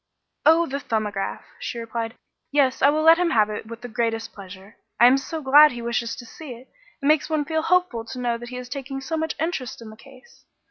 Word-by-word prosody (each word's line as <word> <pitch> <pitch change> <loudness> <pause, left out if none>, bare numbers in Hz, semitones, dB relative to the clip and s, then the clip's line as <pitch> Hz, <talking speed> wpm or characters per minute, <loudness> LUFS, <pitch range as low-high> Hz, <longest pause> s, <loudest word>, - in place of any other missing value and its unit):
"Oh, 330 +2 +6
the 280 -2 -4
'Thumbograph,'" 210 -6 -3
she - - -5
replied. 230 0 -4 0.4
"Yes, 275 -3 +2
I 280 - +6
will 310 +1 +1
let 325 +1 +7
him 355 -1 +2
have 215 -8 +3
it 210 +1 -6
with 230 +1 -9
the 245 - -6
greatest 225 -1 -2
pleasure. 195 +1 -12 0.2
I 240 - +8
am 250 +2 +7
so 310 +3 -4
glad 290 +2 +7
he 240 - -6
wishes 235 0 -2
to 240 - -10
see 275 +3 -9
it; 250 +3 -16 0.3
it - - -5
makes 305 +1 +3
one 310 -2 0
feel 320 0 -1
hopeful 355 -9 +1
to 250 +3 -7
know 240 -1 -1
that 240 0 -9
he 250 - -7
is 250 0 -7
taking 270 +1 -5
so 290 +5 -4
much 320 0 -2
interest 320 -6 -3
in 225 -2 -10
the - - -12
case. 260 +2 -18
255 Hz, 235 wpm, -23 LUFS, 230-305 Hz, 0.4 s, I